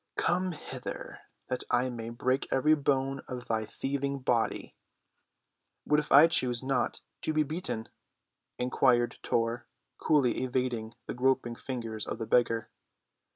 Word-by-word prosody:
"Come 180 +1 +1
hither, 150 - -6 0.3
that 125 - -2
I 125 +1 +2
may 115 -1 -5
break 130 +3 0
every 150 +4 +4
bone 135 -2 +1
of 125 -1 -6
thy 110 -1 -1
thieving 140 +4 -2
body!" 125 -3 -1 1.1
"What 150 - +3
if 150 - -5
I 145 +4 +10
choose 130 -7 +2
not 130 -2 0 0.2
to 155 - -1
be 155 0 +3
beaten?" 150 -7 -4 0.7
inquired 125 -1 +2
Tor, 115 +1 -1 0.3
coolly 140 -6 +3
evading 125 -3 -2
the - - -4
groping 130 -1 +1
fingers 115 -3 -5
of - - -3
the 115 - -4
beggar. 115 0 +2
130 Hz, 135 wpm, -30 LUFS, 120-140 Hz, 1.1 s, I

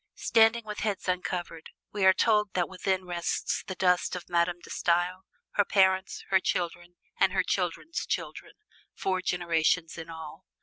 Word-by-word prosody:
Standing 225 0 +3
with 210 -1 -6
heads 205 -3 -2
uncovered, 180 -2 -3 0.2
we 200 -2 0
are 190 - +9
told 210 0 +2
that 180 -2 +1
within 190 0 -2
rests 175 -1 -2
the 185 - -4
dust 180 0 +2
of 180 - -8
Madame 175 0 +1
De - - -11
Stael, 180 +2 0 0.3
her 205 - +3
parents, 190 -1 +2
her 190 - +5
children, 175 -1 -3 0.2
and 195 - +4
her 190 -1 +2
children's 185 - -2
children - - -4 0.4
four 185 -1 -1
generations 170 -1 0
in 165 0 -8
all. 160 +2 -9
185 Hz, 160 wpm, -28 LUFS, 175-190 Hz, 0.4 s, are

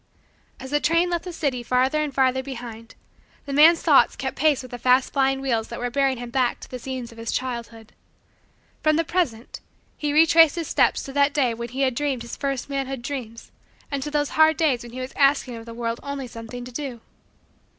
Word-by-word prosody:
As 265 0 -8
the 295 - +2
train 335 +4 +2
left 345 0 -2
the 360 - -5
city 280 -7 -2
farther 255 +5 +1
and 300 -1 -2
farther 260 -1 +2
behind, 235 -4 -9 0.5
the 280 - -5
man's 320 +4 +6
thoughts - - +5
kept - - -4
pace 295 -4 +2
with 255 - -11
the 245 - -7
fast 255 +2 +3
flying 270 -1 +1
wheels 230 -5 -1
that 235 - -7
were 245 0 -3
bearing 270 -1 +1
him 240 0 -7
back 250 -1 +1
to - - -11
the 250 - -5
scenes 255 -1 -6
of 230 - -14
his 230 - -3
childhood. 235 -3 -5 0.9
From 310 0 +3
the 330 - +2
present, 310 -10 -2 0.4
he 295 -1 -2
retraced 325 0 +6
his 335 -3 -3
steps - - +2
to 270 - -8
that 285 0 +2
day 255 -5 +2
when 235 +1 -6
he 260 +3 -4
had 260 -2 +2
dreamed 270 -2 -2
his 235 - -7
first 275 -3 -3
manhood 270 -3 -4
dreams 240 -4 -6 0.4
and 280 -1 -2
to 295 - -4
those 290 -1 0
hard 315 0 +4
days 285 -7 +2
when 240 - -10
he 255 - -5
was 255 - -6
asking 275 -3 +2
of 230 0 -10
the 230 - -7
world 230 0 -3
only 280 -1 -5
something 235 +1 -8
to 250 - -9
do. 250 -3 -6
265 Hz, 220 wpm, -23 LUFS, 240-290 Hz, 0.9 s, man's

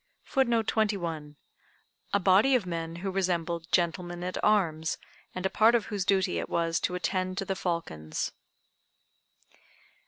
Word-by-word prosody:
] - - -45
[Footnote 235 -4 +3
21: 170 -10 -1 0.8
A 200 - +3
body 200 +8 +5
of 235 -7 +1
men 165 -1 -4
who 195 - 0
resembled 170 -3 -1
"Gentlemen 175 0 0
at 180 0 -3
arms," 165 -7 +2 0.4
and 185 +1 -4
a - - +3
part 225 +2 +5
of 230 - +1
whose 200 -3 -1
duty 190 - +2
it - - -4
was 165 0 +1
to 180 - -1
attend 185 0 -1
to 195 - -1
the 195 - -2
falcons. 165 - -3
180 Hz, 150 wpm, -29 LUFS, 165-200 Hz, 0.8 s, body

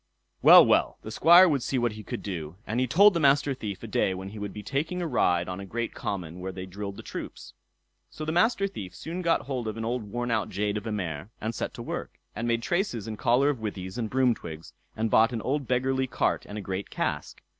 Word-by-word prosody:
Well, - - +10
well, - - +2
the 110 - -7
Squire 170 +10 +7
would 145 -6 +1
see 130 - -1
what 120 -2 +1
he 110 0 -8
could 100 - -6
do; 85 -5 -5
and 115 +3 -2
he 130 - +1
told 200 - +6
the 170 - 0
Master 140 -1 +3
Thief 105 -6 -6
a - - -5
day 95 -2 +1
when 95 +1 -6
he 105 +1 -9
would 105 -1 -4
be 105 - -8
taking 155 - -2
a 175 - -2
ride 90 - +1
on 90 0 -5
a - - -6
great 115 +4 -4
common 90 -3 -5
where 95 +1 -4
they 95 0 -7
drilled 100 +2 -6
the - - -9
troops. - - -8 0.6
So 155 - -7
the 155 - -1
Master 195 +4 +3
Thief 95 - -6
soon 170 +3 -5
got 170 -2 +2
hold 130 -4 -4
of 110 0 -4
an 115 - -3
old 120 +2 -1
worn 120 +4 -3
out 110 -2 0
jade 105 +1 -1
of 105 +2 -6
a - - -2
mare, 85 -4 -4
and 110 +2 -3
set - - -4
to - - -7
work, - - -5 0.2
and 115 +2 -3
made 115 0 0
traces 175 - -1
and 110 - -4
collar 125 +7 +3
of 135 - -6
withies 100 -1 -5
and 110 -2 -2
broom 130 0 +3
twigs, 80 -6 -9 0.2
and 110 0 -1
bought 115 +3 +5
an 115 - -2
old 140 0 -1
beggarly 130 +1 +1
cart 125 - -1
and 105 - -6
a - - -4
great 95 0 -4
cask. - - -3
115 Hz, 250 wpm, -27 LUFS, 100-135 Hz, 0.6 s, Well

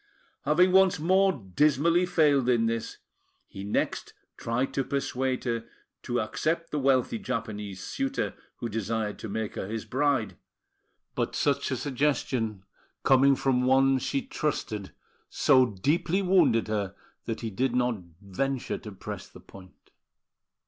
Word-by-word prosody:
Having 175 +6 +4
once 190 0 +5
more 190 +4 +4
dismally 150 - +2
failed 145 -7 +3
in 115 -2 +3
this, 115 0 -2 0.5
he 95 - -8
next 100 - -2 0.2
tried 115 +3 -2
to 135 - 0
persuade 130 -1 -2
her 115 -2 -2 0.4
to 120 0 -1
accept 165 +9 -2
the 150 - -1
wealthy 130 -4 +2
Japanese 105 -6 -4
suitor 275 0 -2 0.2
who 120 - -4
desired 110 -1 -2
to 110 - -6
make 110 +1 -3
her - - -4
his 110 +1 -4
bride; 140 -4 0 0.8
but - - -2
such 140 -1 +1
a 130 - -1
suggestion 130 -6 -1 0.4
coming 135 +1 +5
from 130 -2 +1
one 135 +1 +4
she 275 - -2
trusted 110 - -3 0.4
so 130 -3 +4
deeply 160 - 0
wounded 180 - +3
her 100 -3 -2 0.3
that 115 -1 -4
he 115 -2 -4
did 125 +4 0
not 125 -2 +1 0.2
venture 125 +7 -2
to 105 - -9
press 95 - -7
the - - -14
point. 95 -2 -16
130 Hz, 140 wpm, -28 LUFS, 110-145 Hz, 0.8 s, once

